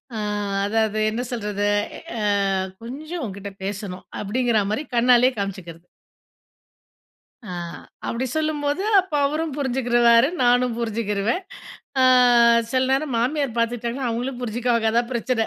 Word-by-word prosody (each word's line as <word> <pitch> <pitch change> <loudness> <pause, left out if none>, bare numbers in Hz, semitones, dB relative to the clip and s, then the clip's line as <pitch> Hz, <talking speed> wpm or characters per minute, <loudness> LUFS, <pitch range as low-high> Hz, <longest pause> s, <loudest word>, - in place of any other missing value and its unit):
அ, - - -3 0.5
அதாவது, 215 0 0
என்ன 230 +3 -2
சொல்றது? 205 -3 -2 0.5
அ - - -2 0.6
கொஞ்சம் 305 +7 -6
உன்கிட்ட 200 -1 -7 0.2
பேசணும் 195 -2 -5 0.2
அப்டிங்ற 230 +1 +1
மாரி 275 - -1
கண்ணாலயே 250 +1 +5
காமிச்சுக்கிறது. 180 -4 -6 1.6
ஆ. 215 - -9 0.6
அப்டி 250 +3 -2
சொல்லும்போது 305 +2 -1 0.2
அப்போ 365 -5 -4
அவரும் 305 0 -2
புரிஞ்சுக்கிருவாரு. 240 -2 +3 0.2
நானும் 245 -1 +3
புரிஞ்சுக்கிருவேன். 225 - -1 0.6
ஆ. - - +6 0.7
சில 255 0 +2
நேரம் 275 -1 0
மாமியார் 260 -1 -1
பார்த்துட்டாங்கன்னா, 240 +2 -1
அவங்களும் 245 +2 -3
புரிஞ்சுக்குவாங்க, 230 -1 0
அதான் 235 +1 +1
பிரச்சனை. 235 -1 0
240 Hz, 115 wpm, -23 LUFS, 220-260 Hz, 1.6 s, ஆ